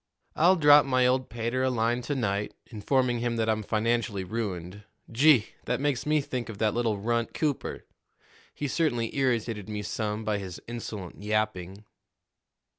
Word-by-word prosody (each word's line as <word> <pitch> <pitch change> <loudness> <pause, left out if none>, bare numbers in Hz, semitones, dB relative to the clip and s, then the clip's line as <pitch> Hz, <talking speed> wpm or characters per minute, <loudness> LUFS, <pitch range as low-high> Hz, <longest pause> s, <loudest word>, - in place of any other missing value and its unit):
"I'll 175 +4 +5
drop 145 -3 +6
my 130 -1 +3
old 130 +1 +1
pater 120 +2 -2
a 130 - +2
line 120 0 0
to 145 - +1
night, 105 -4 -1 0.2
informing 120 +2 +1
him 120 0 -1
that 110 -1 0
I'm 110 -1 +1
financially 110 -1 0
ruined. 95 -2 -4 0.3
Gee! 130 -1 +5 0.2
that 125 0 -1
makes 145 -1 -1
me 150 0 +3
think 125 -3 -4
of 110 - -7
that 105 0 +1
little 115 -3 0
runt, 115 +3 -1
Cooper! 150 -4 -2 0.7
He 145 - -3
certainly 125 -7 0
irritated 115 -6 -1
me 105 -1 -4
some 105 +1 -3
by 105 -2 0
his 95 -3 -7
insolent 110 -6 -7
yapping." 105 -2 -2
115 Hz, 160 wpm, -27 LUFS, 105-130 Hz, 0.7 s, drop